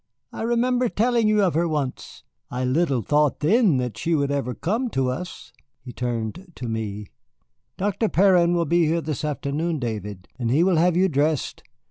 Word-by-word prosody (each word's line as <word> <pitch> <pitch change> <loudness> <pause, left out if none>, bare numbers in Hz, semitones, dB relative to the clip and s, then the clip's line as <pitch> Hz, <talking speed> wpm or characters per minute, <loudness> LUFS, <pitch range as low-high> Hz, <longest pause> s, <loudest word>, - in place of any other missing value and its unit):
I - - -6
remember 240 +2 +1
telling 230 +1 +1
you 215 -1 +3
of 185 - +2
her 170 +3 +1
once. 145 -5 -4 0.3
I 125 +1 -2
little 135 -2 +1
thought 150 +6 +2
then 195 - +4
that 125 -3 -3
she 165 0 0
would 140 -2 0
ever 130 -3 -2
come 230 +8 -1
to 130 - 0
us." 180 +7 -7 0.3
He 125 -1 -9
turned 120 - -4
to 125 - -6
me. 105 -2 -4 0.7
"Dr. 205 +3 0
Perrin 180 -2 +4
will 170 -1 +1
be 170 +1 +2
here 165 +2 +1
this 155 -3 -4
afternoon, 150 +3 -2
David, 105 -7 -5
and 120 -2 -1
he 145 +7 +3
will 180 -2 +3
have 175 +1 +3
you 190 +1 +4
dressed. 150 -2 -1
155 Hz, 180 wpm, -23 LUFS, 125-185 Hz, 0.7 s, then